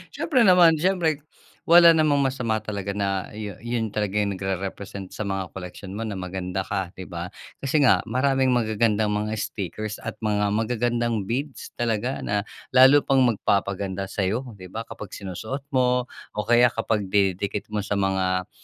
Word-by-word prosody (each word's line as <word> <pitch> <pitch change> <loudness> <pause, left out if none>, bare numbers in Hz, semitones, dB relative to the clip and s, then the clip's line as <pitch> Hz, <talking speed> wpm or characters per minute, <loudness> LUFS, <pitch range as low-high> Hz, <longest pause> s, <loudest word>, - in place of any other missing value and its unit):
Siyempre 260 -7 +2
naman. 180 -5 +7
Siyempre 160 -3 0 0.4
wala 170 0 +8
namang 150 -3 +3
masama 125 -4 0
talaga 100 -2 -5
na 100 -2 -2
yun 105 -2 -6
yun 120 -1 -2
talaga 105 -1 -1
yung 100 -1 +1
nagre-represent 95 0 -5
sa - - -6
mga 95 -2 -4
koleksyon 95 +1 -8
mo 105 - -5
na 105 -3 -4
maganda 90 0 -4
ka, 95 -3 -2
'di 95 - -7
ba? 85 0 -6 0.3
Kasi 140 +3 +2
nga, - - +5
maraming 130 +1 +2
magagandang 110 -2 +1
mga 105 +1 -2
stickers 105 +2 -4
at - - -6
mga 105 -2 0
magagandang 115 0 0
beads 135 +4 -3
talaga 120 +2 -1
na 105 0 0 0.3
lalo 130 +2 +7
pang 135 -1 +3
magpapaganda 100 -4 0
sa'yo, 110 +7 -2
'di 95 - -10
ba, 115 - -3
kapag 105 -3 -10
sinusuot 110 +8 -5
mo 125 -1 +1 0.2
o 105 - -2
kaya 120 +2 +5
kapag 110 -2 -1
dinidikit 100 +1 0
mo 105 - -2
sa 105 - -2
mga 95 -2 0
105 Hz, 160 wpm, -24 LUFS, 100-125 Hz, 0.4 s, wala